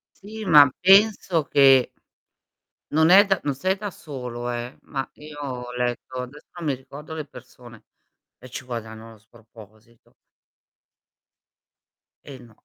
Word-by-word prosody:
Sì 215 Hz, +2 st, -10 dB
ma 145 Hz, -5 st, +7 dB
penso 195 Hz, -4 st, +4 dB
che 135 Hz, -2 st, +5 dB, 1.0 s
non 160 Hz, +2 st, +3 dB
è 200 Hz, +2 st, +9 dB
da 195 Hz, -2 st, 0 dB
non 145 Hz, -, -1 dB
sei 185 Hz, +8 st, -1 dB
da 205 Hz, 0 st, -6 dB
solo 125 Hz, -6 st, -7 dB
eh, 120 Hz, +1 st, -5 dB
ma 135 Hz, -2 st, -4 dB
io 150 Hz, 0 st, -12 dB
ho 125 Hz, -3 st, -6 dB
letto 125 Hz, +1 st, -3 dB
adesso 135 Hz, +4 st, -11 dB
non 170 Hz, -, -6 dB
mi 140 Hz, -, +1 dB
ricordo 140 Hz, +4 st, -11 dB
le 155 Hz, -2 st, -5 dB
persone 125 Hz, -4 st, -15 dB, 0.6 s
e 130 Hz, -, -13 dB
ci 125 Hz, -, -8 dB
guadagnano 115 Hz, -2 st, -8 dB
sproposito. 110 Hz, 0 st, -20 dB, 2.1 s
Eh 135 Hz, -3 st, -11 dB
no, 115 Hz, -3 st, -17 dB
130 Hz, 135 wpm, -23 LUFS, 120-155 Hz, 2.1 s, è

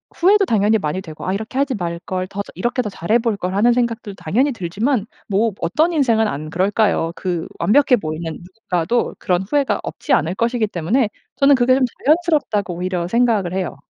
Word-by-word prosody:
후회도 395 Hz, +3 st, +4 dB
당연히 220 Hz, -, +2 dB
많이 170 Hz, 0 st, -3 dB
되고 155 Hz, -4 st, -9 dB
'아 185 Hz, -, 0 dB
이렇게 220 Hz, +5 st, -5 dB
하지 275 Hz, -1 st, +1 dB
말걸. 180 Hz, 0 st, -4 dB
더 200 Hz, +2 st, -5 dB
저 -, -, -13 dB
이렇게 240 Hz, +8 st, -1 dB
더 -, -, -4 dB
잘해 195 Hz, +4 st, +1 dB
볼걸.' 200 Hz, -5 st, -2 dB
하는 235 Hz, +4 st, +4 dB
생각도 235 Hz, -3 st, -2 dB
당연히 235 Hz, -, 0 dB
들지만 210 Hz, +4 st, -1 dB, 0.2 s
뭐 215 Hz, +3 st, +1 dB
어떤 305 Hz, -, +1 dB
인생은 235 Hz, -9 st, +2 dB
안 155 Hz, -1 st, -5 dB
그럴까요. 190 Hz, -1 st, +1 dB
그 175 Hz, -3 st, -3 dB
완벽해 260 Hz, +2 st, +4 dB
보이는 160 Hz, -1 st, -4 dB
누군가도 180 Hz, +3 st, -2 dB
그런 180 Hz, -1 st, 0 dB
후회가 280 Hz, +7 st, 0 dB
없지 290 Hz, -, -3 dB
않을 160 Hz, +4 st, +1 dB
것이기 235 Hz, 0 st, 0 dB
때문에 205 Hz, +6 st, 0 dB, 0.3 s
저는 280 Hz, 0 st, +5 dB
그게 255 Hz, 0 st, +3 dB
좀 265 Hz, -, +2 dB, 0.2 s
자연스럽다고 295 Hz, -, +1 dB
오히려 180 Hz, 0 st, -2 dB
생각을 225 Hz, -6 st, +1 dB
해요. 185 Hz, -5 st, -2 dB
210 Hz, 410 characters per minute, -19 LUFS, 180-245 Hz, 0.3 s, 저는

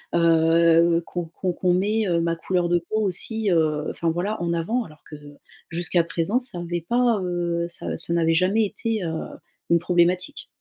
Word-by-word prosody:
heu, 165 Hz, 0 st, +4 dB
qu'on 175 Hz, -1 st, -4 dB
qu'on 175 Hz, +3 st, -3 dB
qu'on, 180 Hz, 0 st, +1 dB
heu, -, -, +2 dB
met 215 Hz, +3 st, 0 dB, 0.2 s
ma 165 Hz, 0 st, 0 dB
couleur 175 Hz, 0 st, -1 dB
de 175 Hz, -, +3 dB
peau 215 Hz, +6 st, -3 dB
aussi, 215 Hz, +2 st, +1 dB
heu, 155 Hz, -2 st, +1 dB
enfin 165 Hz, -, -2 dB
voilà 185 Hz, +6 st, -2 dB
en 170 Hz, 0 st, -1 dB
avant 220 Hz, +9 st, -1 dB
alors 155 Hz, -1 st, -16 dB
que 150 Hz, -, -8 dB, 0.5 s
jusqu'à 175 Hz, +1 st, +1 dB
présent 170 Hz, +8 st, -1 dB
ça 240 Hz, -8 st, -4 dB
avait 175 Hz, -1 st, -4 dB
pas, 240 Hz, -2 st, +2 dB
heu, 175 Hz, -1 st, -2 dB
ça 170 Hz, -, -5 dB
ça 170 Hz, -, -1 dB
n'avait 165 Hz, -1 st, +2 dB
jamais 195 Hz, +6 st, +2 dB
été, 215 Hz, 0 st, -3 dB
heu, 170 Hz, -, -2 dB, 0.6 s
une 170 Hz, 0 st, +4 dB
problématique. 180 Hz, +1 st, 0 dB
175 Hz, 180 wpm, -23 LUFS, 170-195 Hz, 0.6 s, heu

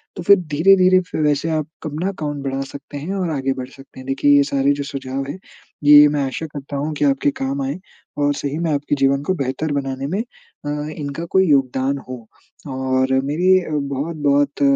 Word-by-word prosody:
तो 175 Hz, -, -6 dB
फिर 200 Hz, +2 st, +7 dB
धीरे-धीरे 185 Hz, +3 st, +4 dB, 0.2 s
वैसे 150 Hz, +2 st, +1 dB
आप 155 Hz, -1 st, -1 dB, 0.2 s
अपना 155 Hz, +5 st, -3 dB
अकाउंट 145 Hz, -6 st, -5 dB
बढ़ा 135 Hz, 0 st, -2 dB
सकते 140 Hz, +1 st, -9 dB
हैं 160 Hz, +7 st, -4 dB
और 185 Hz, -3 st, -1 dB
आगे 135 Hz, -2 st, -1 dB
बढ़ 130 Hz, -1 st, -7 dB
सकते 135 Hz, -1 st, -15 dB
हैं। 130 Hz, -, -11 dB
देखिए 145 Hz, +2 st, +3 dB
ये 140 Hz, -, +5 dB
सारे 140 Hz, 0 st, +1 dB
जो 140 Hz, 0 st, -4 dB
सुझाव 135 Hz, -1 st, -4 dB
हैं 185 Hz, -, -6 dB, 0.4 s
ये 150 Hz, 0 st, +9 dB
मैं 145 Hz, -1 st, -1 dB
आशा 135 Hz, +4 st, -4 dB
करता 145 Hz, -1 st, -7 dB
हूँ 150 Hz, +2 st, -2 dB
कि 145 Hz, -, +1 dB
आपके 140 Hz, +1 st, +2 dB
काम 135 Hz, +1 st, -1 dB
आएँ 140 Hz, +7 st, -3 dB, 0.4 s
और 145 Hz, 0 st, +2 dB
सही 145 Hz, +2 st, -3 dB
में 165 Hz, -2 st, 0 dB
आपके 145 Hz, 0 st, 0 dB
जीवन 135 Hz, 0 st, +2 dB
को 185 Hz, -, 0 dB
बेहतर 140 Hz, +2 st, -2 dB
बनाने 135 Hz, -1 st, -3 dB
में 195 Hz, +7 st, -1 dB, 0.4 s
अ, 145 Hz, -, -2 dB, 0.3 s
इनका 145 Hz, +2 st, -5 dB
कोई 190 Hz, -1 st, +4 dB
योगदान 135 Hz, 0 st, +2 dB
हो। 130 Hz, -, -4 dB, 0.6 s
और 130 Hz, 0 st, 0 dB
मेरी 160 Hz, +7 st, 0 dB, 0.4 s
बहुत-बहुत 145 Hz, 0 st, 0 dB
145 Hz, 190 wpm, -20 LUFS, 135-155 Hz, 0.6 s, ये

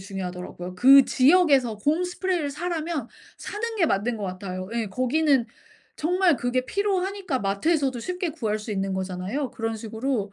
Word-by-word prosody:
중요하더라고요. 180 Hz, -2 st, -6 dB
그 270 Hz, +6 st, +8 dB
지역에서 275 Hz, -5 st, +4 dB
곰 295 Hz, -, +1 dB
스프레이를 355 Hz, -4 st, -1 dB
사라면 320 Hz, -3 st, -3 dB, 0.3 s
사는 450 Hz, +2 st, -5 dB
게 375 Hz, -, +3 dB
맞는 225 Hz, 0 st, 0 dB
것 210 Hz, -, -7 dB
같아요. 185 Hz, 0 st, -5 dB
예. 230 Hz, -1 st, -1 dB
거기는 255 Hz, +4 st, +2 dB, 0.5 s
정말 355 Hz, 0 st, +2 dB
그게 255 Hz, +1 st, -1 dB
필요하니까 385 Hz, -3 st, -1 dB
마트에서도 260 Hz, +7 st, 0 dB
쉽게 360 Hz, +5 st, -3 dB
구할 225 Hz, -9 st, -2 dB
수 215 Hz, +1 st, -8 dB
있는 195 Hz, -1 st, -2 dB
거잖아요. 190 Hz, +9 st, -3 dB
그런 225 Hz, 0 st, -3 dB
식으로 220 Hz, -1 st, -3 dB
255 Hz, 370 characters per minute, -25 LUFS, 205-335 Hz, 0.5 s, 그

